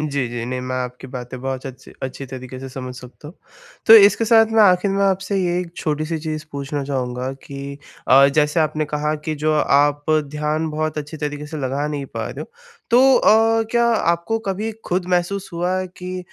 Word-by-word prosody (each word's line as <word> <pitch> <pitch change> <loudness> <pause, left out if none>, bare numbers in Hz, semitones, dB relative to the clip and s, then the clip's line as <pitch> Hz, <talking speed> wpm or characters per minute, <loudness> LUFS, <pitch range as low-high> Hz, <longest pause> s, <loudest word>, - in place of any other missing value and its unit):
जी, 140 -3 -1
जी 120 -1 -4
नहीं 125 0 -3
मैं 130 0 -4
आपकी 125 +1 -5
बातें 125 -1 -7
बहुत 135 0 -4
अच्छी 130 -1 -11
अच्छी 130 +1 -5
तरीक़े 130 0 -8
से 135 - -7
समझ 130 -1 -7
सकता 125 +4 -12
हूँ। 175 - -13 0.5
तो 225 - +10
इसके 210 +1 +7
साथ 225 0 +5
मैं 225 -1 +5
आख़िर 185 0 +4
में 195 +1 0
आपसे 195 +1 0
ये 175 0 0
एक 170 -2 -7
छोटी-सी 155 +1 -2
चीज़ 155 -1 -5
पूछना 140 0 -4
चाहूँगा 130 -1 -3
कि 140 0 -7 0.3
अ, 135 +2 +7
जैसे 150 +2 +2
आपने 155 0 0
कहा 150 +1 -1
कि 155 - -2
जो 155 - +2
आप 145 0 +2 0.3
ध्यान 150 +1 -1
बहुत 155 0 -2
अच्छी 150 +2 -6
तरीक़े 150 0 -4
से 155 +1 -7
लगा 135 +3 -2
नहीं 145 -2 -4
पा - - -5
रहे - - -8
हो - - -8 0.4
तो 240 - +6 0.2
अ, 225 +1 +4
क्या 235 0 +3
आपको 215 -1 +1
कभी 200 +3 -2 0.2
ख़ुद 180 0 -1
महसूस 180 +2 0
हुआ 175 +2 -1
है 185 - -3
कि 185 0 -6
150 Hz, 200 wpm, -20 LUFS, 135-180 Hz, 0.5 s, तो